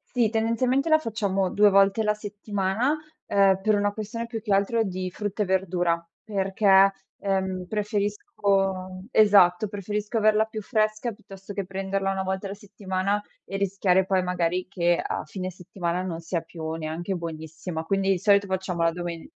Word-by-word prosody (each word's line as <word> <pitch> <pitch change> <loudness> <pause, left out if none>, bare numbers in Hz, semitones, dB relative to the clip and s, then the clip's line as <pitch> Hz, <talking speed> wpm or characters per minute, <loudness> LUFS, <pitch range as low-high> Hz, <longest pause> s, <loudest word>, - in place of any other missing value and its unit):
sì, 235 -3 +3
tendenzialmente 235 +6 +1
la 315 - +7
facciamo 200 -7 -1
2 205 +2 +5
volte 195 +2 +4
la 210 0 +2
settimana, 210 +5 -1 0.3
ehm, 195 -1 +4
per 215 +2 +3
una 205 0 +1
questione 220 +2 -5
più 230 -1 -5
che 210 -2 0
altro 200 +4 +2
di 185 -2 -3
frutta 210 +2 -2
e - - -3
verdura, 175 -3 0 0.2
perché, 195 -1 +4 0.3
ehm, 190 -2 -1
preferisco 210 - -2 0.8
esatto, 205 -3 +5
preferisco 210 +3 -3
averla 215 0 +4
più 220 -1 -6
fresca 215 +1 0
piuttosto 200 -2 -11
che 200 -1 -3
prenderla 195 +1 -2
1 190 0 -2
volta 190 +1 -3
alla 195 - -6
settimana 200 0 -2 0.2
e 195 - -7
rischiare 190 -1 +2
poi, 190 -1 +1
magari, 180 0 -1
che 175 -2 +1
a - - -3
fine 185 +4 -5
settimana 180 0 -3
non 175 -3 -4
sia 165 0 -3
più 160 -2 -7
neanche 165 +4 -3
buonissima, 160 0 -5
quindi 195 +1 +2
i 185 - -2
solito 200 0 +4
facciamo 190 -2 -2
la 165 - +3
domen 170 -1 -5
195 Hz, 165 wpm, -25 LUFS, 185-210 Hz, 0.8 s, la